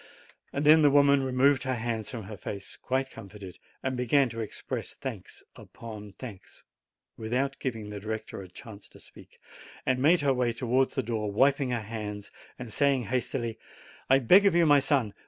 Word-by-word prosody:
Then 150 +3 +5
the 145 - +6
woman 140 0 +5
removed 130 +1 +3
her 130 -1 -1
hands 115 -2 -3
from 115 -3 -6
her 105 +2 -8
face, 100 0 -7
quite 130 +1 -2
comforted, 100 -4 -11 0.2
and 130 0 -1
began 125 +2 +2
to 115 0 -7
express 110 - -5
thanks - - -7
upon 105 -3 -10
thanks, 110 -7 -11 0.5
without 125 +5 -2
giving 110 -5 -4
the 105 - -6
director 110 0 -5
a 95 - -10
chance 105 +2 -12
to - - -17
speak, - - -16 0.5
and 130 0 +1
made 160 +4 +4
her 140 -2 +2
way 125 -2 0
towards 125 +2 0
the 130 - 0
door, 110 -2 -2
wiping 135 +4 +2
her 120 -3 -2
eyes, 105 -2 -6 0.3
and 120 -4 -8
saying 140 -3 +2
hastily: 120 0 -3 0.5
"I 135 - +7
beg 185 - +6
of 190 - +2
you, 170 -1 +5
my 145 -2 +6
son. 130 -7 +1
125 Hz, 175 wpm, -28 LUFS, 110-135 Hz, 0.5 s, I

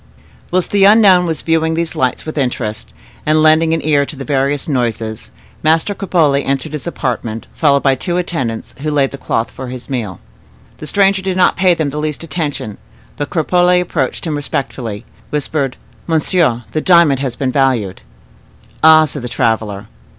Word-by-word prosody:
Whilst 180 0 0
the 200 -1 +3
unknown 195 -4 +6
was 160 -2 -3
viewing 160 0 +1
these 170 0 -2
lights 130 -1 -1
with 155 - -6
interest, 120 -6 -3 0.3
and 155 0 +2
lending 155 +1 +4
an 165 -1 -1
ear 145 -2 +3
to - - -7
the 135 0 -7
various 140 0 0
noises, 115 - -2 0.3
Master 160 +6 +2
Cropole 160 -8 +1
entered 140 +3 -2
his 150 +2 -5
apartment, 115 -7 -3
followed 140 -3 +2
by 135 - +4
two 175 +7 -2
attendants, 135 -11 -3
who 155 +2 -3
laid 140 -3 +1
the 140 - -8
cloth 115 - -2
for 130 - -8
his 125 +2 -8
meal. 110 -9 -3 0.6
The 155 - -8
stranger 195 +3 +2
did 190 -1 -2
not 185 - +4
pay 185 -2 +3
them 155 -4 -2
the 150 - -4
least 150 +1 -3
attention; 145 - -4 0.4
but 145 - -4
Cropole 180 +2 +2
approaching 165 -2 -2
him - - -1
respectfully, 125 -6 -4 0.2
whispered, 145 -2 -2 0.3
"Monsieur, 160 -6 +1
the 155 - -1
diamond 170 -7 +4
has 130 -3 -3
been 130 -2 -1
valued." 125 -9 0 0.8
"Ah!" 155 0 +7
said 145 -1 -5
the 120 - -5
traveler. 110 -5 -1
145 Hz, 170 wpm, -16 LUFS, 130-165 Hz, 0.8 s, Ah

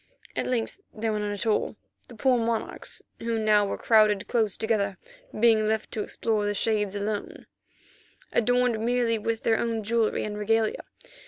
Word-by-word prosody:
At - - -1
length 250 - -2
there 220 0 -2
were 210 - -1
none 210 0 -2
at 205 +2 -4
all, 220 0 +1 0.3
the 240 - -12
poor 250 +2 +3
monarchs, 230 -1 -3 0.2
who 230 0 -1
now 210 -2 +3
were - - -3
crowded 215 -3 +4
close 220 -5 +1
together, 200 -4 0 0.4
being 220 -1 +4
left 220 0 -1
to 215 - -2
explore 215 0 -1
the 205 0 -1
shades 210 -1 0
alone, 205 0 -4 0.9
adorned 245 -1 +2
merely 235 -1 +1
with 225 +1 -2
their 225 -1 +2
own 230 -2 -1
jewellery 225 +1 +1
and 210 0 -4
regalia. 220 +1 +1
220 Hz, 165 wpm, -27 LUFS, 210-230 Hz, 0.9 s, crowded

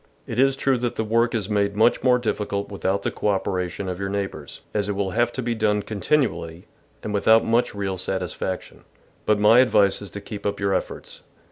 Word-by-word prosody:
" - - -37
It 115 - -4
is 135 0 +4
true 135 -2 +1
that 120 -1 -2
the 110 - -1
work 115 +2 +1
is 105 -4 -1
made 100 -1 0
much 110 +3 +3
more 125 -1 +4
diffi 110 -3 -2
cult 100 0 -3
without 100 0 -2
the - - -1
co - - -3
operation 95 -1 -1
of 90 0 -4
your 100 0 -3
neighbours, 95 -7 -5
as 105 -1 -1
it - - 0
will 95 -1 -2
have 120 +3 +1
to 130 - -4
be 120 0 -1
done 105 -2 +1
continually 100 - -1 0.4
and 105 - -4
without 110 +2 +4
much 115 -1 +1
real 95 -2 -3
satisfaction, 95 0 -4 0.4
but 105 - +4
my 105 +3 +6
advice 105 -7 +3
is 100 - -7
to 100 - -7
keep 100 0 -8
up 100 0 -2
your 100 -1 0
efforts. - - -4
105 Hz, 220 wpm, -23 LUFS, 100-115 Hz, 0.4 s, my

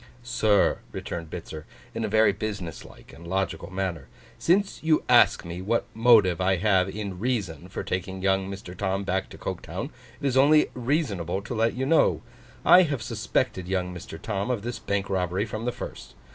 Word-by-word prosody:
'Sir,' 115 -4 +2
returned 85 -2 -5
Bitzer, 80 -2 -7 0.3
in - - -3
a - - 0
very 110 0 +4
business 100 -6 -5
like - - -15
and 85 +1 -12
logical 95 +2 -2
manner, 95 -7 -3 0.3
'since 195 +4 +2
you 160 -1 +2
ask - - +5
me 85 +1 -6
what 115 +5 0
motive 110 -7 +5
I 95 +1 +3
have 95 0 +2
in 100 -2 -5
reason, 100 - -2
for - - -5
taking 95 +1 -3
young 95 0 +1
Mr. 95 -2 -8
Tom 95 +1 -1
back 95 0 -1
to - - -11
Coketown, - - -5 0.3
it - - -5
is 135 -2 +1
only 150 +3 +5
reasonable 110 - -1
to 115 - -5
let 115 0 +1
you 130 +1 -1
know. 160 +4 +3 0.4
I 180 - +9
have 145 -9 -1
suspected 110 -4 -1
young 90 -1 -1
Mr. 85 -2 -8
Tom 100 +4 -3
of 120 -5 -1
this 120 +1 -4
bank 100 -1 -2
robbery 95 +1 0
from 110 +1 -5
the 125 - +1
first. - - -9
100 Hz, 185 wpm, -26 LUFS, 90-120 Hz, 0.4 s, I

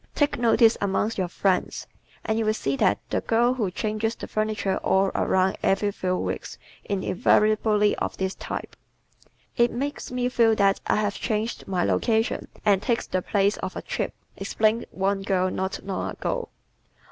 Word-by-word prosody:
Take 290 -4 +1
notice 230 -1 +4
amongst 200 +2 0
your 185 - 0
friends 185 +1 0 0.4
and 220 0 0
you - - +1
will 215 0 +1
see 140 -9 -1
that 100 - +3
the - - +1
girl 235 +2 +2
who 225 -7 -1
changes 215 +4 -2
the - - -8
furniture 215 -2 -1
all 190 0 +2
around 190 0 +1
every 205 +1 +2
few 185 -2 -1
weeks - - -4 0.3
is 200 -2 -2
invariably 210 +2 +3
of - - -3
this 190 0 -1
type. - - -6 0.8
"It 235 0 +4
makes 285 +4 -4
me 250 0 0
feel 230 -3 +3
that 195 -1 +3
I - - +3
have 210 -1 0
changed 220 +2 -3
my 185 -2 0
location 220 - +1 0.2
and 200 -2 +4
takes 235 +2 0
the 185 - -1
place 200 +2 +1
of - - -5
a - - -5
trip," - - -3 0.2
explained 220 +2 0
one 195 +1 -1
girl 185 -1 +1
not 190 0 -3
long 195 -1 -3
ago. - - -3
210 Hz, 170 wpm, -25 LUFS, 190-225 Hz, 0.8 s, notice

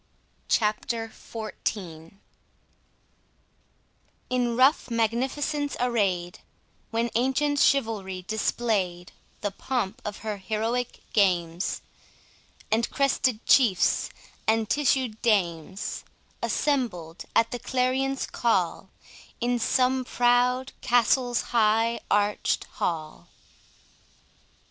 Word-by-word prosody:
CHAPTER 225 +1 0
XIV 195 -8 -6 2.2
In 245 -2 +1
rough 265 +1 +4
magnificence 265 +6 -1
array'd, 195 -8 0 0.5
When 230 0 -1
ancient 265 +4 +1
Chivalry 210 -10 +1
display'd 200 -5 -1 0.3
The 205 - -1
pomp 230 -3 -3
of 210 -1 -5
her 210 -2 -2
heroic 225 +5 -2
games, 175 -4 +1 0.9
And 225 +2 +2
crested 260 -4 +1
chiefs 230 -9 +4 0.4
and 220 0 +2
tissued 260 -5 +1
dames 190 -4 0 0.4
Assembled, 200 - -1
at 230 - +3
the 245 - -4
clarion's 260 +2 0
call, 190 -4 0 0.5
In 240 0 0
some 255 +2 +2
proud 250 +2 +2
castle's 245 0 +3
high 225 +1 +3
arch'd 205 0 +1
hall. 155 -3 -4
230 Hz, 85 wpm, -26 LUFS, 200-250 Hz, 2.2 s, rough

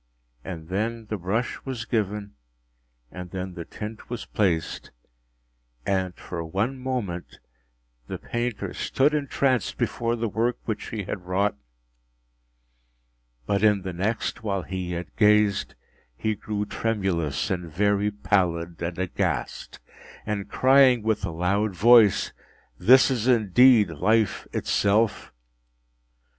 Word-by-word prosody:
And 85 -3 -7
then 110 +4 -2
the 105 - -1
brush 105 +8 -2
was 125 -4 -5
given, 105 -3 -2 0.8
and 90 -1 -8
then 95 0 -5
the 85 -2 -7
tint 110 +1 -8
was 120 -2 -5
placed; 90 -6 -1 1.0
and, 95 -2 0
for 85 -2 -6
one 100 +11 -1
moment, 120 -10 -4 0.7
the - - -5
painter 120 -1 -3
stood 145 +3 +1
entranced 135 -5 0
before 115 0 -1
the 115 0 -2
work 115 +4 0
which 110 -2 -3
he 110 -3 -4
had 90 -1 -6
wrought; 100 +3 +1 1.9
but 100 +6 0
in 105 -3 +3
the 95 -1 -4
next, 110 +6 -2
while 100 -4 -2
he 95 -1 -5
yet 90 0 -5
gazed, 105 -2 +3 0.4
he 110 +8 0
grew 105 0 -3
tremulous 95 -12 -1
and 90 -3 -3
very 100 +4 +1
pallid, 85 -5 -1
and 85 0 -3
aghast, 95 -1 -3 0.5
and 105 -2 -3
crying 130 -3 +5
with 110 -1 0
a - - -3
loud 95 +5 0
voice, 110 0 +5 0.5
‘This 130 +3 +6
is 120 -2 -1
indeed 115 -2 +5
Life 105 +6 +1
itself! 105 +2 +1
105 Hz, 125 wpm, -25 LUFS, 90-115 Hz, 1.9 s, This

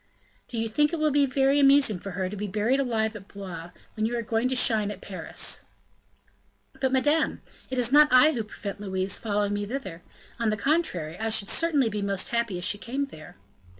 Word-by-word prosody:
"Do 240 - -6
you 225 0 -1
think 295 +7 +2
it 335 - -2
will 310 -1 +1
be 285 0 +3
very 270 +2 +2
amusing 275 -7 +5
for 195 +1 -7
her 190 -1 -1
to 195 - -6
be 205 +1 -4
buried 215 +7 +1
alive 225 -4 0
at 200 -1 -10
Blois, 180 -5 -8 0.2
when 215 0 -1
you 240 +1 -2
are 235 - -2
going 225 +3 0
to 260 - 0
shine 220 -4 +4
at 205 -2 -7
Paris?" 190 -2 -3 1.2
"But, 265 -1 +1
madame, 295 +4 +1 0.3
it 260 - -4
is 245 -1 +2
not 300 +1 +7
I 255 +5 +6
who 235 -7 -2
prevent 205 -1 -7
Louise 190 -1 -1
following 205 -2 -1
me 205 0 -3
thither; 195 -9 -6 0.4
on 230 -2 +1
the 215 - -1
contrary, 195 - -1
I 225 0 -1
should 210 -2 +2
certainly 305 -7 +2
be 210 -1 -3
most 200 -1 -1
happy 235 -5 -1
if 175 - -6
she 205 +2 0
came 270 +6 -3
there." 155 - -13
225 Hz, 215 wpm, -26 LUFS, 200-270 Hz, 1.2 s, not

